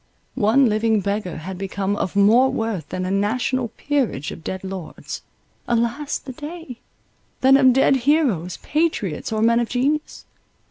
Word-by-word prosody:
One 255 +3 +3
living 220 0 +2
beggar 200 -3 -3
had 180 +3 -7
become 195 +1 -2
of 195 -2 -3
more 225 +6 +5
worth 220 - -3
than 185 0 -3
a 185 - -2
national 235 +5 0
peerage 240 - -2
of 160 - -10
dead 190 +4 -5
lords— 190 -3 -7 0.5
alas 235 +5 0
the 260 - -9
day!—than 290 -3 -3
of 265 -2 +6
dead 270 +1 +4
heroes, 245 - +1
patriots, 295 - -1
or 220 0 0
men 230 +1 +4
of 235 - -1
genius. 285 +5 -1
230 Hz, 145 wpm, -22 LUFS, 195-265 Hz, 0.5 s, of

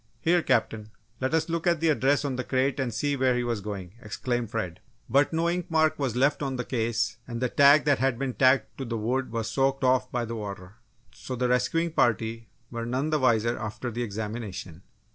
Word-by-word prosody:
"Here, 175 +1 +3
Captain, 110 -6 0 0.3
let 130 +4 0
us 160 0 +1
look 170 +1 -2
at 170 -2 +3
the 165 +1 +2
address 145 0 +2
on 135 -2 -1
the 125 - -2
crate 130 +3 0
and 130 -3 -1
see 145 +6 -1
where 130 -2 +2
he 125 - 0
was 120 -3 -2
going!" 95 -3 -6
exclaimed 120 +1 -3
Fred. 90 -6 -4 0.3
But 140 +5 +3
no 165 +1 +1
ink 175 0 -2
mark 160 -2 +2
was 130 -5 -1
left 140 +4 +2
on 135 -2 -2
the 125 - -3
case 115 -2 -1
and 120 -1 -5
the 125 0 0
tag 145 +3 +6
that 145 -2 +3
had 130 -2 +1
been 135 0 -2
tacked 130 +2 +2
to 135 - -3
the 115 -1 -3
wood 125 +4 -1
was 115 -1 -2
soaked 135 +3 0
off 130 0 +2
by 120 -1 -1
the 115 +1 -5
water. 100 -2 -7 0.3
So 130 - -7
the 125 0 0
rescuing 145 +7 +1
party 115 - 0 0.2
were 115 -1 -4
none 135 +5 -1
the 155 - +2
wiser 115 -2 +2
after 110 +3 -4
the 120 +2 -4
examination. 105 -5 -5
125 Hz, 220 wpm, -27 LUFS, 115-140 Hz, 0.3 s, tag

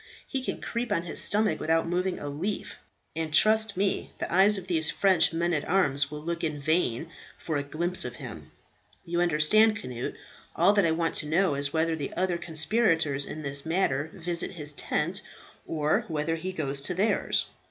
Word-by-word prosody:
He 265 - -3
can - - -4
creep 235 -1 -3
on 170 -5 +1
his 170 - 0
stomach 210 +1 +3
without 165 +1 +1
moving 180 +2 -1
a 145 - -6
leaf, 165 +9 -4 0.4
and 160 -1 -3
trust 215 +5 +4
me 195 0 -1
the - - -4
eyes 200 +3 +6
of 190 - -6
these 160 -4 +2
French 190 -4 +3
men 170 +1 0
at 150 - 0
arms 145 -6 +2
will 150 0 -7
look 170 +2 -3
in 155 -3 -2
vain 155 -1 0 0.3
for 160 - -4
a 145 - +1
glimpse 170 +5 -2
of 125 -1 -5
him." 80 - -9 0.6
"You 170 +1 -1
understand, 175 +7 +4
Cnut, 125 - -5 0.4
all 180 +5 +5
that 200 -4 +3
I - - +2
want 165 0 0
to 150 - -2
know 170 +1 +2
is 140 0 -1
whether 160 +1 +1
the 145 -3 -5
other 180 -1 0
conspirators 160 -4 +1
in 155 - -7
this 140 0 -1
matter 160 -4 0
visit 175 -3 -1
his 150 -4 -3
tent, 170 +6 -1 0.5
or 155 -1 0
whether 160 +1 -1
he 180 +3 -4
goes 140 -6 -2
to 175 +6 -3
theirs." 205 +3 +1
165 Hz, 190 wpm, -27 LUFS, 150-185 Hz, 0.6 s, eyes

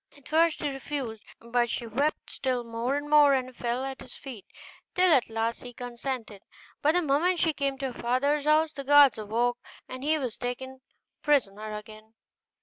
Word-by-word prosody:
At 280 - -16
first 325 0 +2
he 295 - +1
refused, 270 -5 -5 0.2
but 240 +1 0
she 235 - -2
wept 275 +7 -1
still 255 -3 -1
more 230 +3 -2
and 290 +1 -3
more, 295 -2 +6
and 255 -1 -3
fell 240 +2 -2
at 270 0 -6
his - - -10
feet, 245 -8 -10 0.5
till 365 -2 +5
at 255 -6 +3
last 225 +1 -2
he 245 -1 -9
consented; 240 -3 -5 0.4
but 305 +2 +3
the 355 0 +2
moment 320 +5 +2
she 325 -2 +2
came 275 -2 -1
to 265 -1 -3
her - - -10
father's 280 +5 +1
house 310 +1 +4
the 280 -3 -7
guards 280 -5 +6
awoke 235 +3 0 0.3
and 255 +1 -8
he 310 +2 +2
was 255 -6 -4
taken 260 +2 -5 0.4
prisoner 215 -7 0
again. 215 +1 -11
260 Hz, 185 wpm, -28 LUFS, 235-290 Hz, 0.5 s, more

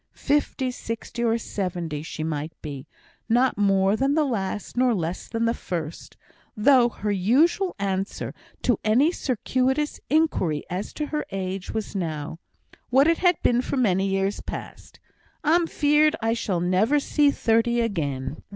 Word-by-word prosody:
Fifty, 280 -2 0
sixty, 235 0 -5
or 230 -1 +2
seventy, 175 -8 -4
she 155 0 -6
might 155 0 -4
be 140 -1 -7 0.4
not 245 +3 +3
more 195 0 +3
than 270 +5 +1
the 315 - +3
last, 210 -6 -3
not 245 -3 +3
less 170 +1 -4
than 230 0 -1
the 230 - +2
first 165 -7 -6 0.4
though 245 +2 +5
her 210 -2 -3
usual 285 - +2
answer 195 0 -3 0.3
to 245 -5 +2
any 250 +10 +4
circuitous 265 - -1
inquiry 265 - +1
as 185 +3 -3
to 300 - -3
her 300 0 -2
age 190 -1 -4
was 220 -2 -4
now 160 -3 -4 0.5
(what 270 +4 +5
it 330 0 +3
had 355 -1 +4
been 245 0 +3
for 270 - -3
many 195 -6 +2
years 195 +1 -1
past), - - -8 0.4
"I'm 330 +2 +3
feared 300 +1 +3
I 225 0 +1
shall 200 -7 -1
never 195 +11 +3
see 290 +1 +3
thirty 235 -2 +2
again." 145 - -2
225 Hz, 150 wpm, -24 LUFS, 185-265 Hz, 0.5 s, though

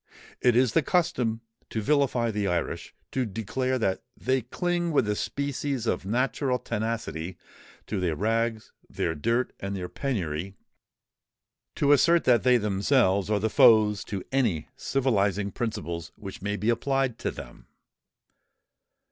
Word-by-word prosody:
It 125 -2 +4
is 125 -2 +3
the 165 - +4
custom 135 -9 0 0.3
to 110 - -2
vilify 125 -2 +2
the 105 -2 -1
Irish—to 90 +8 -3
declare 125 +5 -2
that 95 -5 0 0.2
they 130 +1 +1
cling 175 - -1
with 135 -7 +2
a 105 - +1
species 140 -1 -2
of 95 - -1
natural 125 +3 0
tenacity 105 -8 -3 0.5
to 105 - -3
their 85 -4 0
rags, 115 +3 -1 0.2
their 80 - -1
dirt, 115 - 0
and 100 0 -4
their 90 -2 -4
penury—to 95 - -3 1.4
assert 170 +4 +5
that 120 -3 +4
they 125 -1 +5
themselves 100 -1 +2
are 105 -1 +2
the 110 - +1
foes 110 -4 +5
to 95 -3 -4
any 115 - 0
civilizing 105 -7 0
principles 85 - -4
which 95 -2 -9
may 105 +1 -2
be 105 +3 +1
applied 135 +1 0
to - - -1
them. - - -10
115 Hz, 135 wpm, -27 LUFS, 100-130 Hz, 1.4 s, assert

